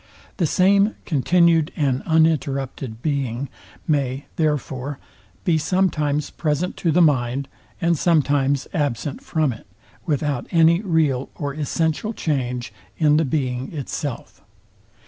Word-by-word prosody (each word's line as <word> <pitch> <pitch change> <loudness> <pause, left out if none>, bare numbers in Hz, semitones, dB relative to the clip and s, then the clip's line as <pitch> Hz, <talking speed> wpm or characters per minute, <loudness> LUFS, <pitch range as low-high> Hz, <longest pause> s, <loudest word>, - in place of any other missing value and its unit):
The 175 -6 +2
same 200 +5 +3
continued 165 +1 +3
and 135 -4 0
uninterrupted 140 -7 0
Being 140 -3 -1 0.4
may, 140 -3 0
therefore, 145 -3 -1 0.5
be 165 -3 +2
sometimes 150 -5 0
present 160 +3 -1
to 170 - 0
the 175 +3 +5
mind, 135 -2 +1 0.3
and 170 -2 +2
sometimes 145 -4 +2
absent 145 - -2
from 155 -5 0
it, 110 - -14 0.4
without 145 -4 -1
any 165 +1 +4
real 155 -9 +1
or 145 -2 -3
essential 160 - -1
change 125 - -2 0.2
in 150 -2 +4
the 160 - +2
Being 130 -2 -2
itself. 140 -1 -5
150 Hz, 115 wpm, -22 LUFS, 135-165 Hz, 0.5 s, the